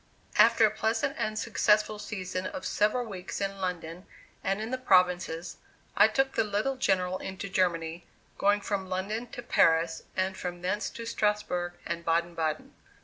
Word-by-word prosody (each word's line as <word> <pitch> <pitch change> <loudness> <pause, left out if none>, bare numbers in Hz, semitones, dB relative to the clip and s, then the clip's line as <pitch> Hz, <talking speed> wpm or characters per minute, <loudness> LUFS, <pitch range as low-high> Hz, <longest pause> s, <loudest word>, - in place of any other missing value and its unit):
After 230 -1 +7
a 215 - +2
pleasant 225 +6 0
and 215 0 -1
successful 215 -1 +2
season 185 -3 -4
of - - -6
several 215 +4 +1
weeks 190 -4 -6
in 195 -1 -3
London 180 -1 -4 0.4
and 195 +1 0
in 220 +2 -4
the 255 - -2
provinces, 180 -6 +2 0.4
I 210 - +7
took 270 +4 +1
the - - +2
little 210 +6 -1
General 185 -6 +1
into 190 +1 -5
Germany, 170 -3 0 0.3
going 205 +1 +3
from 195 -2 -3
London 205 +6 -2
to 240 - -8
Paris 165 -7 +3 0.2
and 190 0 0
from 175 -1 -6
thence 205 +4 -1
to 230 - -8
Strasbourg 210 -6 0
and 170 - -3
Baden 170 +1 +1
Baden. 155 -2 -2
195 Hz, 160 wpm, -29 LUFS, 180-215 Hz, 0.4 s, After